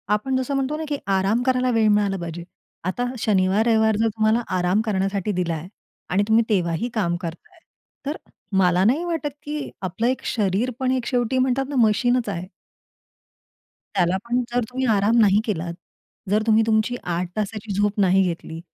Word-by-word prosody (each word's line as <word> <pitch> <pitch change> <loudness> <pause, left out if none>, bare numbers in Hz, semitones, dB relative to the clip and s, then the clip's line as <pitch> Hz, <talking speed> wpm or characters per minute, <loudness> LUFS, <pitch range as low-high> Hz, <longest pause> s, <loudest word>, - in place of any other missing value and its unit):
आपण 260 +5 -2
जसं 260 +2 -2
म्हणतो 275 +2 -1
ना 320 - -4
की 290 - -1 0.2
आराम 200 +5 +1
करायला 255 -1 +2
वेळ 225 -2 +3
मिळाला 205 -2 +2
पाहिजे. 170 -1 -6 0.4
आता 185 +8 -2
हा 245 - -4
शनिवार-रविवार 220 +2 +3
जर 225 - +2
तुम्हाला 220 +1 +1 0.2
आराम 180 +4 +2
करण्यासाठी 200 -1 -1
दिला 180 -3 -1
आहे 160 +2 -6 0.4
आणि 200 +3 +2
तुम्ही 225 +1 +4
तेव्हाही 180 +3 0
काम 175 -6 0
करताय, 175 - -8 0.5
तर 290 +3 -2 0.4
मला 180 -1 +4
नाही 275 +9 +3
वाटत, 325 -4 -2
की 295 0 -4
आपलं 190 +5 -1
एक 255 +1 -1
शरीर 215 +3 0
पण 260 -1 +1
एक 255 -2 -1
शेवटी 250 0 0
म्हणतात 260 +1 +1
ना 290 - -4
मशीनच 245 +2 +1
आहे 185 -2 -4 1.5
त्याला 180 -1 +2
पण 240 +1 +1
जर 245 0 +1
तुम्ही 260 +1 -2
आराम 205 +4 +2
नाही 205 -1 +5
केलात, 170 -5 -2 0.6
जर 210 +2 +2
तुम्ही 220 0 +5
तुमची 220 +2 +2
8 175 +1 -2
तासाची 210 0 -3
झोप 205 0 0
नाही 190 0 +4
घेतली 165 -2 -4
215 Hz, 175 wpm, -23 LUFS, 190-245 Hz, 1.5 s, नाही